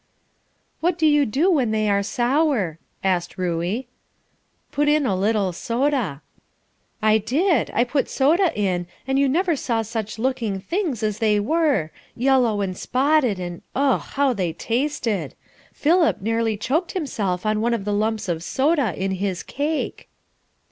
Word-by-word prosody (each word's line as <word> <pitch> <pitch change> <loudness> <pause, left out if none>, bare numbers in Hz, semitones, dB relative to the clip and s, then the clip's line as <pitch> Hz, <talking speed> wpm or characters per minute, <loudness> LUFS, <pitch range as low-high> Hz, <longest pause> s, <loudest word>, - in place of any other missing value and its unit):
"What 340 +1 +1
do 320 - +1
you 295 -2 +4
do 295 - +2
when 270 -9 +2
they 215 0 0
are 200 -1 +2
sour?" 240 - 0 0.2
asked 180 -3 0
Ruey. 180 +7 -2 0.8
"Put 295 0 +1
in 300 -1 +3
a 200 -6 +1
little 200 -1 +1
soda." 235 - -1 0.8
"I 215 0 +5
did. 315 - +1
I 235 - +4
put 270 +3 -1
soda 330 +7 +3
in, 180 -3 0 0.2
and 270 0 +1
you 280 -1 +3
never 340 +4 +2
saw 230 -4 -1
such 220 -1 -4
looking 230 -5 -1
things 315 - -2
as 215 -1 -1
they 210 -2 +3
were, 275 - +1 0.2
yellow 245 -4 +2
and 185 -2 -2
spotted, 260 -3 +1
and 175 -1 -6
ugh! 275 0 +2
how 275 -2 0
they 180 -7 -2
tasted. 230 - -2 0.4
Philip 330 +2 +2
nearly 225 +1 0
choked 310 - -1
himself 210 - -2
on 215 0 +1
one 235 +1 +2
of 200 -4 -5
the 205 - -1
lumps 215 0 -1
of 165 -2 -2
soda 270 - +1
in 190 0 -1
his 190 -1 -2
cake." 300 +2 -3
230 Hz, 155 wpm, -22 LUFS, 200-285 Hz, 0.8 s, I